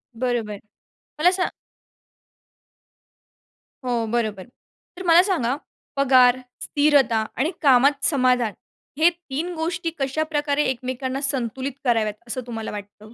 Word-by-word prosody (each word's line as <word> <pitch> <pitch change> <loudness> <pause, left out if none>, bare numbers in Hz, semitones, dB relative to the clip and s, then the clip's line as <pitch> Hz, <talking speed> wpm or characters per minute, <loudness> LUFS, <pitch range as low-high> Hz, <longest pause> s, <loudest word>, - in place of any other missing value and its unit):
बरोबर, 230 -4 -2 0.6
मला 355 +3 +5
स 365 - +1 2.4
हो 235 -2 0
बरोबर. 215 -5 -1 0.5
तर 370 - -6
मला 340 +1 +7
सांगा 280 - 0 0.4
पगार, 255 -2 +5 0.2
स्थिरता 285 -7 +3
आणि 300 +7 +1
कामात 275 0 +4
समाधान 250 -6 +2 0.5
हे 335 +2 +7
3 340 0 -5
गोष्टी 335 +1 -2
कशाप्रकारे 295 +1 0
एकमेकांना 260 +1 -3
संतुलित 265 -1 -2
कराव्यात 225 -4 +1
असं 255 +2 -3
तुम्हाला 225 -2 -5
वाटतं? 210 +1 -10
260 Hz, 105 wpm, -23 LUFS, 235-295 Hz, 2.4 s, मला